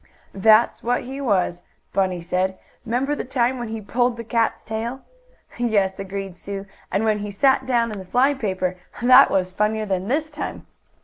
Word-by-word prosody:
"That's 215 +3 +4
what 245 +1 0
he 270 +3 -6
was," 185 -7 +1 0.3
Bunny 185 -2 0
said. 185 +2 -1 0.3
"'Member 250 +5 0
the - - -3
time 250 0 0
when 240 - -4
he 220 0 -5
pulled 240 +4 0
the 230 - -5
cat's 230 0 0
tail?" 230 +4 -4 0.6
"Yes," 205 -5 +1
agreed 195 -1 -5
Sue. 195 +2 -6 0.3
"And 200 - +1
when 215 -1 +2
he 205 0 -4
sat 265 +6 +2
down 235 -3 +2
in 210 - -5
the - - -7
fly 250 +9 +3
paper! 185 -7 -2 0.2
That 255 +3 +7
was 185 -1 0
funnier 215 +3 0
than 190 -1 -2
this 305 +5 -1
time." 295 - -6
220 Hz, 180 wpm, -22 LUFS, 195-245 Hz, 0.6 s, That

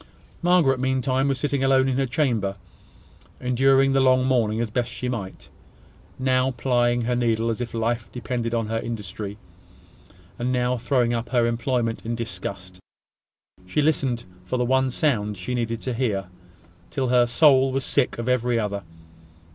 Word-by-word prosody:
Margaret 170 -7 +3
meantime 130 +1 +1
was 135 -1 0
sitting 140 0 -1
alone 135 0 +4
in 130 -1 0
her 135 -1 +1
chamber, 120 -8 0 0.8
enduring 135 +2 +3
the 135 - +3
long 130 -1 +4
morning 115 -4 +1
as 120 - +1
she - - -18
best 125 +2 -3
might. 100 -6 -6 0.7
Now 130 0 +2
plying 120 -1 +1
her 125 +1 0
needle 115 -1 +1
as 115 - -4
if 120 -1 -5
life 115 0 -1
depended 120 -1 -3
on 115 -1 0
her 115 +1 -2
industry, 105 -3 -5 1.0
and 125 +1 -1
now 125 0 +1
throwing 120 -1 +1
up 115 0 -3
her 120 -2 +2
employment 115 0 -1
in 115 +1 -3
disgust, 95 -4 -6 0.9
she 150 +11 +1
listened 135 -6 0 0.2
for 110 +8 -2
the 125 - +1
one 130 +1 +2
sound 110 -7 0
she 90 +7 -4
needed 115 -2 -2
to 130 - -2
hear, 105 -7 -1 0.6
till 130 -2 -1
her 125 -1 +4
soul 135 +1 +5
was 135 0 -1
sick 140 -3 +1
of 115 +1 -4
every 125 -1 +1
other. 100 -2 -2
125 Hz, 165 wpm, -24 LUFS, 115-130 Hz, 1.0 s, soul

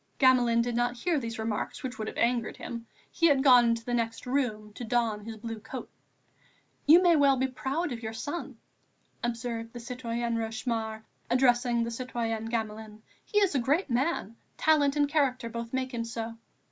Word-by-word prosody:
Gamelin 245 -3 +4
did 240 0 -2
not 245 +1 0
hear 325 +4 +1
these 230 -3 -5
remarks, 220 -1 -3
which 255 -3 -5
would 215 - -3
have - - -6
angered 235 -1 +1
him; 235 -1 -7 0.2
he 335 - +3
had 275 -3 +4
gone 250 -3 +7
into 230 0 0
the 245 - -2
next 230 -1 -1
room 230 -6 -1
to 245 - -7
don 225 -3 0
his 225 -1 -7
blue 225 0 -6
coat. 230 +4 -8 1.0
"You 335 +5 +8
may 345 -2 +6
well 280 -3 +5
be 260 - +1
proud 270 +5 -2
of 235 -2 -5
your 220 -1 -4
son," 275 +1 -5 0.7
observed 230 -1 -3
the 240 - -7
citoyenne 235 -1 -3
Rochemaure, 220 -1 -3 0.3
addressing 245 -1 +3
the 230 - -3
citoyenne 230 -2 -3
Gamelin. 220 -1 -4 0.2
"He 415 - -3
is 390 -5 +3
a 275 - +2
great 285 +5 +1
man; 240 -3 0 0.2
talent 295 -3 +3
and 290 -1 +3
character 275 -5 +1
both 235 0 -5
make 260 0 -2
him 230 -1 -2
so." 230 0 -5
240 Hz, 185 wpm, -29 LUFS, 230-265 Hz, 1.0 s, You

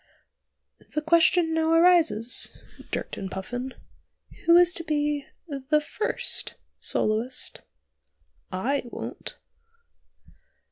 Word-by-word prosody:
"The 305 - +1
question 335 +1 +4
now 320 0 +1
arises," 330 -9 +3 0.3
jerked - - -4
in 190 - -5
Puffin, 245 +7 -5 0.7
"who 335 0 +8
is 355 0 +6
to 335 - -1
be 295 -2 -1 0.2
the 285 0 0
first 360 +8 +1 0.2
soloist? 225 +4 -1 0.9
I 250 +10 -1
won't." 240 - -7
295 Hz, 90 wpm, -26 LUFS, 245-330 Hz, 0.9 s, who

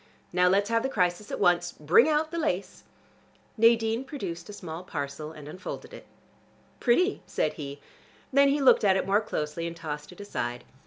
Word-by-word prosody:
Now 180 0 +4
let's 200 +4 +2
have 230 0 +3
the 265 - -1
crisis 185 -3 0
at - - -3
once. 175 0 +2
Bring 170 - +4
out 310 +1 +1
the 335 - -2
lace." 195 - -2 0.7
Nadine 230 +1 +3
produced 200 - -6
a - - -7
small 175 -4 -7
parcel 150 -2 -5
and 150 -2 -11
unfolded 185 +6 -7
it. - - -11 0.7
"Pretty," 360 - +2
said - - 0
he. 140 -2 -7 0.5
Then 280 +1 +6
he 285 +1 +1
looked 265 - +6
at 195 -2 +4
it - - -1
more 200 +3 +3
closely, 165 -5 -3
and 170 - -6
tossed 150 -2 -6
it 180 - -15
aside. 120 -12 -4
185 Hz, 180 wpm, -27 LUFS, 160-230 Hz, 0.7 s, Then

